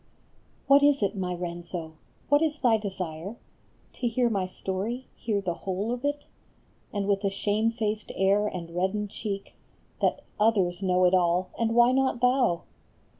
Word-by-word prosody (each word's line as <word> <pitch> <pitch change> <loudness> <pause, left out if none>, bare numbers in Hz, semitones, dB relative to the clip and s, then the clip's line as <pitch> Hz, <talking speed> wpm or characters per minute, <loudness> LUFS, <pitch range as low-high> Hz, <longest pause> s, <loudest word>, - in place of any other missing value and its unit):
HAT 280 +1 +7
is 285 -5 +4
it, 200 +1 0
my 185 -2 -2
Renzo? 170 -1 -5 0.3
What 290 +1 +4
is 310 -2 +1
thy 245 -6 +4
desire? 190 -1 -5 0.6
To 245 - -2
hear 240 +1 +1
my 195 -3 0
story, 200 +7 -4
hear 210 -3 -1
the 180 -3 -1
whole 195 +5 -3
of 245 +1 -3
it? 290 0 -1 0.7
And 200 -1 -2
with 200 0 +1
a 200 - +2
shamefaced 215 +2 -1
air 200 +2 +3
and 170 -4 -5
reddened 195 +3 -1
cheek 200 -3 -5 0.5
That - - +1
" - - -33
others 195 -5 +2
know 185 -1 +3
it 180 - +4
all, 180 0 +2
and 230 0 0
why 240 +1 +6
not 265 -1 +1
thou? 250 -8 +2
205 Hz, 165 wpm, -27 LUFS, 185-235 Hz, 0.7 s, HAT